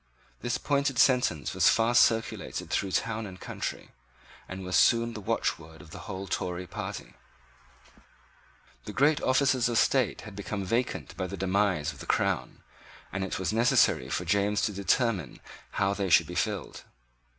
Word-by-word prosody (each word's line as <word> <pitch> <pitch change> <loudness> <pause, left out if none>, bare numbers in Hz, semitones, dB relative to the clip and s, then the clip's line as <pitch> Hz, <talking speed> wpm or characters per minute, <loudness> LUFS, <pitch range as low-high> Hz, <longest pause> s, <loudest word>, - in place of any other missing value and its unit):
This 120 +1 -1
pointed 140 -2 0
sentence 125 - +2
was - - +5
fast 115 +1 +4
circulated 115 -1 0
through 95 - 0
town 115 -1 -1
and 90 -1 -11
country, - - -6 0.6
and 95 0 -6
was 90 - -2
soon 115 0 +4
the 110 - -7
watchword 80 -4 -2
of 80 - -14
the 100 - -10
whole 95 +1 -5
Tory 90 -1 -3
party. - - -7 1.7
The 105 - -7
great 145 +7 +3
offices 130 -2 +2
of 120 - 0
state 130 -4 +2
had 105 -2 -10
become 100 0 -4
vacant 120 +6 -2
by 95 - -2
the 100 - -6
demise 95 -5 0
of 75 - -15
the - - -9
crown - - -1 0.5
and 100 0 -2
it 95 - -3
was 95 +2 -2
necessary 115 - +3
for 75 +6 -2
James 100 +3 +1
to 105 - 0
determine 100 - 0 0.3
how 100 0 +1
they 100 -2 -2
should 80 - +6
be - - -8
filled. - - -3
100 Hz, 160 wpm, -28 LUFS, 90-115 Hz, 1.7 s, should